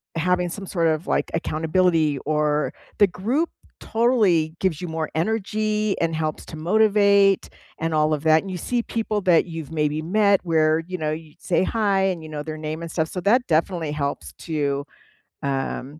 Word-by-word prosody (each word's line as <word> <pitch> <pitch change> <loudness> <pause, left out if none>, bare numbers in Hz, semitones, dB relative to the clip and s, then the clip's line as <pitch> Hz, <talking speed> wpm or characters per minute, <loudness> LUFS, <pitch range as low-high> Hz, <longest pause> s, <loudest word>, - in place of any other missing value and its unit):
having 180 +2 +1
some 195 +2 -7
sort 170 -3 0
of, 155 +2 0
like, - - 0
accountability, 160 -2 +1
or 150 0 +1 0.2
the 205 - +7
group 240 - -1 0.3
totally 210 -9 +2
gives 185 -4 0
you 180 - -4
more 160 -1 -3
energy 215 +2 0
and 165 -1 0
helps 155 -1 -2
to 160 - -8
motivate 200 +2 +3 0.3
and 165 0 -1
all 155 0 +2
of 150 - -8
that. 160 0 +5
And 195 - -8
you 185 - -4
see 240 +7 -1
people 220 -3 -2
that 180 -4 +4
you've 165 -3 -7
maybe 150 -1 0
met 200 +3 +3
where, 155 0 +3
you 185 - -4
know, 155 -2 -2
you’d 150 -1 -20
say - - +4 0.2
hi 200 -3 +2
and 175 - -5
you 155 - -9
know 150 -1 -4
their 155 0 -6
name 155 +1 -3
and 165 - -6
stuff. 160 -2 0
So, 185 - -2
that 245 +3 +5
definitely 165 -2 0
helps 140 - -3 0.2
to, 160 -2 -2 0.9
um, 135 -1 -2
165 Hz, 185 wpm, -23 LUFS, 155-200 Hz, 0.9 s, the